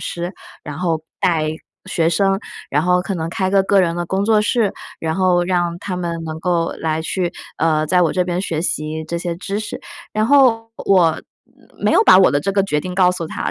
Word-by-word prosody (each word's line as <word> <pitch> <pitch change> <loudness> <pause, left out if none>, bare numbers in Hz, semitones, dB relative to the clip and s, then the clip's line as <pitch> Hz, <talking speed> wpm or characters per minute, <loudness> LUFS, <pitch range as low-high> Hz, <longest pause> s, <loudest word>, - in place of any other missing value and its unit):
师， 175 +2 -5 0.3
然 145 +1 -7
后 165 -3 -1 0.2
带 160 -3 +1 0.4
学 165 -2 +2
生， 195 +3 +2 0.3
然 145 - +2
后 180 0 +3
可 195 - -4
能 160 0 -3
开 190 0 -1
个 195 -1 +3
个 195 0 +4
人 170 -1 0
的 175 -1 -3
工 195 +2 -1
作 215 -1 +4
室， 210 -1 +1 0.3
然 160 +1 -2
后 180 -2 +3
让 175 -1 0
他 185 -2 -4
们 170 -2 -3
能 160 0 -5
够 170 -1 0
来 160 0 -1
去， 175 +1 -2 0.3
呃， 155 -1 +2
在 180 -1 +4
我 160 - +2
这 180 - +1
边 175 0 -2
学 165 -4 -2
习 155 -2 -2
这 170 +2 -4
些 175 -1 -3
知 195 +3 -4
识。 215 - -6 0.3
然 215 0 +1
后 235 -4 +4 0.2
我 175 -5 +4 0.6
没 - - +3
有 - - +5
把 - - +8
我 190 - +6
的 145 - +2
这 195 +7 -2
个 195 -1 +2
决 150 -6 -1
定 180 +2 -6
告 180 -1 +4
诉 175 -3 -4
它， - - -3
180 Hz, 235 characters per minute, -19 LUFS, 165-195 Hz, 0.6 s, 把